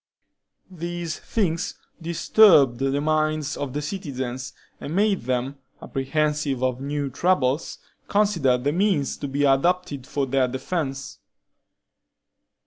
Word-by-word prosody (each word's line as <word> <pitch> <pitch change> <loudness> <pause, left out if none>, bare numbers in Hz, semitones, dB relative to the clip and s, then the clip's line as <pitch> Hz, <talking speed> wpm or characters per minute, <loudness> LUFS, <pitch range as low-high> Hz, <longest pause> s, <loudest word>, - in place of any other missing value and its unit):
These 175 -1 -5
things 170 -7 -1 0.3
disturbed 165 - +5
the 135 +1 0
minds 155 0 0
of 140 -3 -4
the 150 +1 -3
citizens, 130 -7 -4 0.3
and 150 - -5
made 200 0 +2
them, 130 +2 -2 0.2
apprehensive 145 -1 -1
of 130 0 0
new 140 0 -2
troubles, 145 -2 +1 0.3
consider 180 -12 +2
the 135 +4 -1
means 180 -5 +1
to 145 - -4
be 140 +1 -1
adopted 140 0 +1
for 140 -1 -1
their 135 0 +1
defense. 135 +1 -4
145 Hz, 115 wpm, -24 LUFS, 135-170 Hz, 0.3 s, disturbed